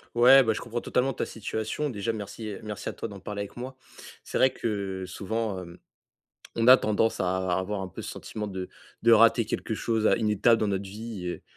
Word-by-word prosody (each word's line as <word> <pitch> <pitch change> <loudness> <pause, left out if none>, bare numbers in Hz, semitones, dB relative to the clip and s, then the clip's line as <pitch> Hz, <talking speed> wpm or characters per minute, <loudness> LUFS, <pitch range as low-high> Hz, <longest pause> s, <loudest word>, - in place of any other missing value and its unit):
Ouais, 130 +3 +8
bah, 110 -2 +2
je - - -5
comprends 120 0 -4
totalement 135 +2 0
ta - - -2
situation. 110 +6 -3
Déjà 115 0 -2
merci 105 0 -6
merci 105 -1 -5
à - - -5
toi - - -5
d'en 100 -3 -10
parler 100 +2 -5
avec 100 +2 -8
moi. 130 +2 -6 0.5
C'est - - -3
vrai 130 - +5
que 100 -4 -3
souvent, 100 +1 -3
hem, 85 0 -11 0.8
on 115 +1 +1
a 130 - +10
tendance 110 0 +1
à 95 0 0
avoir 95 +1 -2
un 95 - -4
peu - - -9
ce - - -6
sentiment 105 -1 -6
de 95 -2 -5 0.3
de 115 - +5
rater 115 0 +6
quelque 110 - -3
chose, 110 0 0
à - - +4
une 110 -2 0
étape 115 +3 +4
dans 105 - +1
notre 100 0 -1
vie 105 -2 -6
et 90 - -5
105 Hz, 220 wpm, -27 LUFS, 95-115 Hz, 0.8 s, a